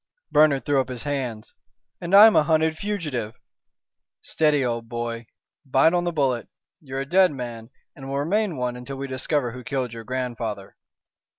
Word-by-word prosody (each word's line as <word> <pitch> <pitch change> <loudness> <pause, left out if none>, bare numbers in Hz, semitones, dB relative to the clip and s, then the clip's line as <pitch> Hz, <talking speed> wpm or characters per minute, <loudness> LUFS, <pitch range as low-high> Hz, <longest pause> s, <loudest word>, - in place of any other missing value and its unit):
Bernard 150 -3 +4
threw 140 -2 +3
up 130 - -6
his 125 -2 -5
hands. 130 -7 -4 0.5
"And 175 +2 +1
I'm 215 +2 +9
a - - +6
hunted 160 +1 +2
fugitive." 155 - -4 0.9
"Steady, 150 -4 +1
old 115 -1 -3
boy. 120 -1 -4 0.4
Bite 135 +4 +3
on 175 0 +1
the 175 - 0
bullet. 135 -7 0 0.3
You're 135 -2 -5
a - - -4
dead 185 +4 +4
man, 120 -4 -7 0.3
and 135 -1 -10
will 135 - -2
remain 180 +4 0
one 125 -1 -2
until 125 +3 -7
we 135 - -4
discover 130 0 -1
who 125 +1 -9
killed 130 -4 -3
your 115 -1 -8
grandfather." 115 -5 -4
135 Hz, 170 wpm, -24 LUFS, 120-155 Hz, 0.9 s, I'm